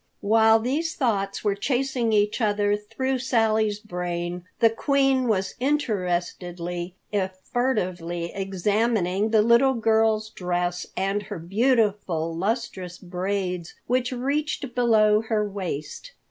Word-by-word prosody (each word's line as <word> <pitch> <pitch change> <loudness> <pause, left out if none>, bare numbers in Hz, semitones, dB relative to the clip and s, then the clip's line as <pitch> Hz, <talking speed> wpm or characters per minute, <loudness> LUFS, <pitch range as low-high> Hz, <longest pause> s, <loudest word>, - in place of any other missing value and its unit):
While 220 +1 +5
these 290 +8 -1
thoughts 200 -7 -1
were 205 -2 +2
chasing 250 +2 0
each 210 +2 +2
other 205 -1 +2
through 240 +6 -2
Sally's 220 -4 +1
brain, 175 -3 -4
the 230 - +5
Queen 270 +1 +2
was 195 -4 0
interestedly, 180 - -2 0.2
if 190 -2 -1 0.2
furtively 180 -9 -1
examining 200 +1 0
the 215 -1 +4
little 235 +4 +4
girl's 220 -1 +2
dress 180 -1 -2
and 195 +2 0
her 205 -1 -7
beautiful, 195 -4 +1
lustrous 190 -2 -3
braids 180 -1 -3
which 250 +1 0
reached 275 +1 -2
below 215 -3 +4
her 220 -2 0
waist. 195 - -5
210 Hz, 115 wpm, -25 LUFS, 180-235 Hz, 0.2 s, While